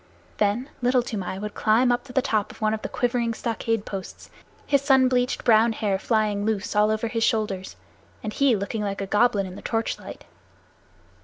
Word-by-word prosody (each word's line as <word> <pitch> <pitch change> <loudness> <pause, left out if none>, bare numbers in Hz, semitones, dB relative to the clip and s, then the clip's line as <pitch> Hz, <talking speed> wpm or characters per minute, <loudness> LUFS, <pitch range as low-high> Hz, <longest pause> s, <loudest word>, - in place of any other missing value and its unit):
Then 215 +5 +1
Little 250 0 +3
Toomai 195 -6 -4
would 210 +1 -5
climb 230 +3 +3
up 245 +1 -1
to 265 - -11
the 265 0 +1
top 215 -5 0
of - - -15
one 215 -1 +1
of 220 - -3
the - - -5
quivering 240 -2 0
stockade 225 -2 -2
posts, 195 -2 -8 0.3
his 280 -1 +2
sun 265 -2 +4
bleached 250 0 0
brown 225 0 +4
hair 205 -3 -1
flying 210 -2 0
loose 210 -1 -2
all 210 0 +4
over 220 +1 0
his 225 0 -1
shoulders, 210 -6 -1 0.5
and 215 -1 -4
he 275 -4 +3
looking 200 +2 -3
like 200 -1 -3
a - - -2
goblin 205 0 +2
in 185 -1 -8
the - - -9
torch 225 -1 -2
light. - - -10
220 Hz, 200 wpm, -24 LUFS, 210-245 Hz, 0.5 s, sun